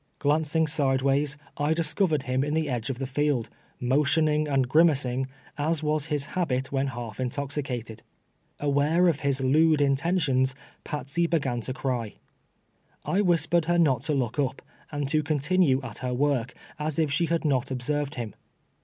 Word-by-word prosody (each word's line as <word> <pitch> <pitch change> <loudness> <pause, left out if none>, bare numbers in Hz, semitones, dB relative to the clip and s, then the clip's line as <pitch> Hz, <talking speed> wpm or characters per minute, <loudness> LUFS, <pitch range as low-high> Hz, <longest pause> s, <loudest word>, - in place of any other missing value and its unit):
Glancing 155 +2 +1
sideways, 140 -1 +1 0.2
I 145 +2 +1
discovered 160 -2 +1
him 130 0 0
in 150 +1 -1
the 160 -1 0
edge 120 0 -2
of 130 - -3
the 135 - -3
field, 135 -2 0 0.3
motioning 150 +4 +2
and 135 -3 +1
grimacing, 135 -4 +3 0.3
as 155 +1 0
was 150 0 0
his 150 -2 -1
habit 130 -8 -1
when 135 0 0
half 120 -4 -6
intoxicated. 130 -4 -3 0.6
Aware 145 +5 +2
of 155 - -1
his 140 -1 0
lewd 155 +4 +4
intentions, 140 -2 +1 0.3
Patsey 150 +4 -2
began 135 -8 0
to 130 - -4
cry. 125 -5 -2 0.9
I 195 - +1
whispered 170 -3 +2
her 175 +1 +2
not 140 -8 +3
to 150 - +2
look 130 0 -1
up, 135 -1 -1 0.3
and 145 -2 -2
to 155 0 +2
continue 150 -1 +2
at 115 -5 -7
her 125 -1 -2
work, 130 -3 0 0.2
as 150 -1 -2
if 155 -3 +1
she 170 +4 +1
had 165 0 -1
not 135 -3 +1
ob 125 -1 -3
served 145 +1 -1
him. 115 -5 -5
145 Hz, 160 wpm, -26 LUFS, 130-155 Hz, 0.9 s, lewd